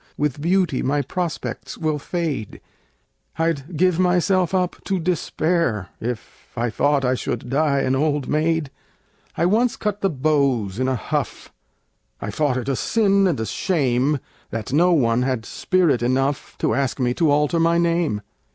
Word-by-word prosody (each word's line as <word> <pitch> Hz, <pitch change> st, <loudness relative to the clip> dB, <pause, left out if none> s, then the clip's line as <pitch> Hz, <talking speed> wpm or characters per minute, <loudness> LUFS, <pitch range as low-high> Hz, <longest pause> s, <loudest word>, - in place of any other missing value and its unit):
With 145 Hz, -1 st, -1 dB
beauty 175 Hz, -4 st, +1 dB
my 145 Hz, +2 st, +1 dB
prospects 175 Hz, +4 st, -4 dB
will 155 Hz, -2 st, -1 dB
fade 150 Hz, -, -3 dB, 0.8 s
I'd 165 Hz, -1 st, -1 dB
give 180 Hz, 0 st, +3 dB
myself 180 Hz, 0 st, +2 dB
up 185 Hz, -2 st, -1 dB
to 195 Hz, -, 0 dB
despair 165 Hz, -, 0 dB
If 120 Hz, 0 st, -6 dB
I 120 Hz, 0 st, 0 dB
thought 145 Hz, +2 st, +2 dB
I 125 Hz, -, +2 dB
should 125 Hz, -1 st, -4 dB
die 140 Hz, -1 st, +2 dB
an 130 Hz, -, +1 dB
old 145 Hz, 0 st, 0 dB
maid! 155 Hz, -1 st, 0 dB, 0.7 s
I 170 Hz, -, +2 dB
once 225 Hz, +6 st, +2 dB
cut 210 Hz, -1 st, -3 dB
the 195 Hz, -, +2 dB
beaux 140 Hz, -, +1 dB
in 130 Hz, -, +1 dB
a 130 Hz, -, +1 dB
huff 110 Hz, -, -4 dB, 0.7 s
I 105 Hz, -, -4 dB
thought 135 Hz, +3 st, 0 dB
it 125 Hz, -, -4 dB
a 135 Hz, -, +1 dB
sin 200 Hz, -, +2 dB
and 165 Hz, -9 st, 0 dB
a 110 Hz, -, -1 dB
shame 140 Hz, -, +1 dB, 0.3 s
That 115 Hz, +2 st, -5 dB
no 175 Hz, +5 st, +4 dB
one 120 Hz, -7 st, +3 dB
had 125 Hz, -3 st, -1 dB
spirit 175 Hz, -10 st, +1 dB
enough 135 Hz, +3 st, -1 dB
To -, -, 0 dB
ask 135 Hz, +2 st, -1 dB
me 125 Hz, -1 st, +1 dB
to 160 Hz, +3 st, +2 dB
alter 150 Hz, +3 st, +2 dB
my 165 Hz, +1 st, +3 dB
name. 170 Hz, -10 st, +1 dB
150 Hz, 160 wpm, -22 LUFS, 130-170 Hz, 0.8 s, no